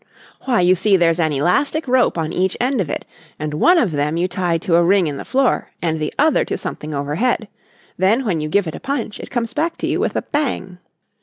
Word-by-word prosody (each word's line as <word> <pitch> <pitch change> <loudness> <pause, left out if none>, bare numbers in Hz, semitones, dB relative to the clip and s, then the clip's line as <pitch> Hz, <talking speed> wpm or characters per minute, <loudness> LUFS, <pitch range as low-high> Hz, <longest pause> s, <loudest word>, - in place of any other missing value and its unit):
"Why, 245 -7 +2
you 180 +1 +5
see 190 +2 +3
there's 170 -1 +2
an 160 -2 +2
elastic 280 - +1
rope 250 -6 +2
on 160 0 -2
each 185 +1 0
end 250 -2 +1
of 165 - -3
it, - - -4 0.3
and 150 0 -4
one 345 - +4
of 230 - +2
them 150 +2 -1
you 175 +2 +1
tie 180 -2 -1
to 175 -1 0
a 170 - +4
ring 190 +1 +3
in 145 -3 -3
the - - -6
floor 270 -1 +1
and 160 -2 -1
the 155 - -2
other 315 +2 +3
to - - -3
something 155 - -6
overhead. 155 - -1 0.5
Then 215 +8 +2
when 175 -7 0
you 155 - -3
give 200 +4 +2
it 160 - -5
a - - -7
punch 260 -6 -4
it - - -8
comes 240 -1 -2
back 325 +4 -1
to - - -3
you - - 0
with - - -1
a - - -1
bang." 240 - -3
185 Hz, 240 wpm, -19 LUFS, 160-245 Hz, 0.5 s, you